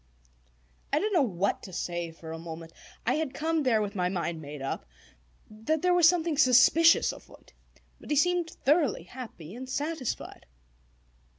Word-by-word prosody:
I 285 - +2
didn't 415 +6 0
know 345 - +4
what 200 -6 0
to 190 - -10
say 175 -1 -3
for 160 0 -10
a 165 - -6
moment. 165 0 -9 0.3
I - - +2
had 310 -4 -3
come 320 +1 0
there 230 -6 +2
with 200 -1 -4
my 180 -3 0
mind 170 -3 -3
made 145 0 -8
up 135 0 -4 0.6
that 255 +10 -2
there 360 0 +4
was 345 -2 +6
something 335 -4 0
suspicious 305 +5 +6
afoot. - - -15 0.5
But - - -13
he 300 - +1
seemed 350 +2 +2
thoroughly 290 - +1
happy 190 -6 -10
and 255 +2 -8
satisfied. 290 -2 -4
255 Hz, 165 wpm, -28 LUFS, -, 0.6 s, was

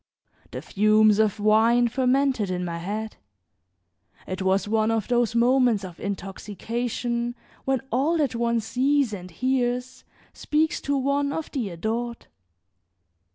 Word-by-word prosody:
The - - -7
fumes 215 +1 +4
of 215 -1 +2
wine 225 +3 +4
fermented 260 -3 +1
in 180 -1 -2
my 170 -1 -4
head; 210 +5 -5 1.1
it 185 +1 -5
was 190 +2 +1
one 220 +1 +1
of 225 -2 0
those 240 -2 +1
moments 240 -3 +3
of 180 -3 -9
intoxication 230 +5 -3 0.3
when 265 -1 +1
all 285 +8 +1
that 290 -6 0
one 235 0 0
sees 260 +2 +1
and 180 -2 -7
hears, 250 +4 -1 0.3
speaks 310 +1 0
to 280 0 0
one 280 +1 0
of 320 +2 -4
the 240 -8 -2
adored. 230 +7 -4
235 Hz, 130 wpm, -25 LUFS, 210-255 Hz, 1.1 s, fumes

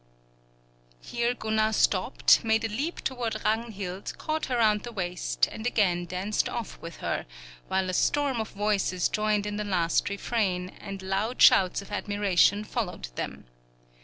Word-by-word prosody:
Here 240 +1 -1
Gunnar 220 -1 0
stopped, - - +3
made 220 0 +2
a - - +1
leap 275 +11 -3
toward 245 -4 -2
Ragnhild, 210 -4 -2
caught 310 0 -2
her 250 -2 0
round 215 -3 +3
the 240 - -7
waist, 175 - -1
and 220 - -4
again 180 -7 +1
danced 185 +4 -1
off - - -6
with - - -8
her, - - -2 0.4
while 190 0 0
a 185 - -2
storm 275 +3 +1
of 220 - -5
voices 200 -3 0
joined 210 -1 0
in 210 0 -3
the 210 - -1
last 180 -4 +1
refrain, 200 -3 -1
and 195 -1 -7
loud 195 +6 -1
shouts 190 +1 +6
of 200 - -15
admiration 205 -1 +2
followed 210 - -4
them. - - -5
210 Hz, 155 wpm, -27 LUFS, 190-225 Hz, 0.4 s, shouts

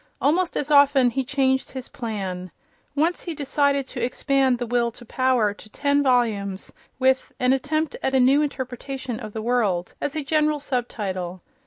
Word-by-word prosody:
Almost 340 +5 +1
as 295 +1 -2
often 280 -3 +5
he 265 +2 -1
changed 265 0 +1
his 260 -1 -7
plan. 190 -6 -5 0.5
Once 325 +4 +1
he 340 -3 -5
decided 280 -1 +1
to - - -4
expand 265 0 +1
"The 245 - -3
Will 240 0 +1
to 240 +1 -13
Power" 250 -4 +1
to 215 - -15
ten 285 +4 +1
volumes, 220 -7 0 0.2
with 260 0 +2
"An 250 +1 +3
Attempt 305 +3 -1
at 265 - 0
a - - +5
New 265 +3 +5
Interpretation 260 -3 -4
of 215 - -7
the 220 - -4
World" 215 -8 0
as 290 - -2
a 305 - -2
general 300 +1 +1
sub 250 -4 -1
title. 185 -5 -5
260 Hz, 175 wpm, -24 LUFS, 235-280 Hz, 0.5 s, often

